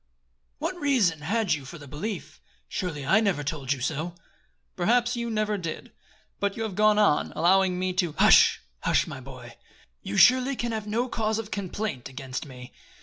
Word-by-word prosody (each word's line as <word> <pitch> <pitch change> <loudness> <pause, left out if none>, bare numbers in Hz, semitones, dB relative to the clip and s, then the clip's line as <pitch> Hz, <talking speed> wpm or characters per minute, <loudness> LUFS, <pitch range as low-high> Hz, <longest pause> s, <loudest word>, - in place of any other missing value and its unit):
"What - - -3
reason 245 - +2
had 195 +4 0
you 145 -3 -3
for 135 +6 -9
the 145 -2 -12
belief? 155 +1 -6 0.3
Surely 155 -7 -4
I 195 +10 +4
never 195 -9 0
told 145 -2 -3
you 140 -3 -1
so." 160 +6 -3 0.6
"Perhaps 240 +7 +2
you 235 0 -3
never 215 -2 -1
did; 165 -3 -6 0.5
but 200 +1 -1
you 225 - -2
have 220 -3 -4
gone 210 +2 +4
on, 205 -8 +3
allowing 185 +1 +3
me 185 0 -1
to 180 -4 0
" - - -25
"Hush! - - +6 0.2
Hush, - - +2
my - - -7
boy. 125 -3 -11 0.4
You 100 - -4
surely 255 +2 +5
can 240 -1 -2
have 215 -1 -4
no 230 +4 0
cause 220 -3 -1
of 225 -1 -5
complaint 200 - -4
against 135 +2 -6
me. 125 -2 -11
185 Hz, 185 wpm, -26 LUFS, 150-220 Hz, 0.6 s, Hush